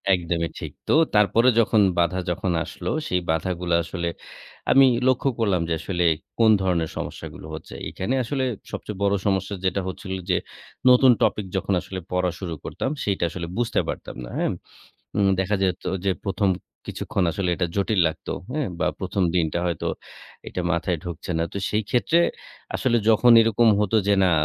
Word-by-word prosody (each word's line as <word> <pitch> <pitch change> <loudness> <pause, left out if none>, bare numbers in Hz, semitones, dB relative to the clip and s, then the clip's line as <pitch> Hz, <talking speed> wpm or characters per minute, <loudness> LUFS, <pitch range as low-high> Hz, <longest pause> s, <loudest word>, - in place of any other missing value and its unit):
একদমই 85 -1 -2
ঠিক। - - -6 0.2
তো, - - +3 0.2
তারপরে 105 +4 +5
যখন 110 -1 +4 0.2
বাধা 85 +2 +2
যখন 90 +1 -1
আসলো - - -6 0.2
সেই 90 0 0
বাধাগুলো 85 +1 -1
আসলে 85 +1 -4 0.6
আমি 135 0 +7 0.2
লক্ষ্য 130 +1 +3
করলাম 100 -6 +2
যে, - - +1
আসলে 90 -2 -1 0.4
কোন 110 -1 +6
ধরনের 85 -4 0
সমস্যাগুলো - - -7
হচ্ছে? - - -10 0.2
এখানে 115 +8 -2
আসলে 130 +3 -2 0.3
সবচেয়ে 105 -2 -6
বড় 100 - +3
সমস্যা 95 0 0
যেটা 95 +1 +1
হচ্ছিল 95 +1 -5 0.2
যে, 90 - +3 0.5
নতুন 125 +1 +7
টপিক 105 - +1
যখন 95 - -1
আসলে 95 -1 -6
পড়া 90 -1 +1
শুরু 90 -4 -4
করতাম - - -3
সেটা 100 -3 -1
আসলে 85 0 -5
বুঝতে 120 -1 +1
পারতাম - - -5
না, - - -8
হ্যাঁ। - - +1 0.7
উম 100 -1 +4
দেখা 95 +2 +1
যেত 90 -1 0 0.2
যে, 95 - +3
প্রথম 100 0 +1 0.4
কিছুক্ষণ 100 - -2
আসলে 95 0 -1
এটা 90 0 0
জটিল 100 +1 +1
লাগতো 80 - -5 0.2
হ্যাঁ, 150 -1 -1
বা - - +2
১ম 95 - -1
দিনটা 85 -1 +1
হয়তো 85 -2 -2 0.6
এটা 90 - -3
মাথায় 85 +1 0
ঢুকছে 90 +1 -6
না। 80 - +1
তো - - -3
সেই 105 +3 0
ক্ষেত্রে 160 +7 +3 0.6
আসলে 120 -2 +2
যখন 120 +2 +6
এরকম 115 +1 +3
হতো 105 +1 +1
যে, 100 - +5
না 95 - +4
95 Hz, 170 wpm, -24 LUFS, 90-110 Hz, 0.7 s, আমি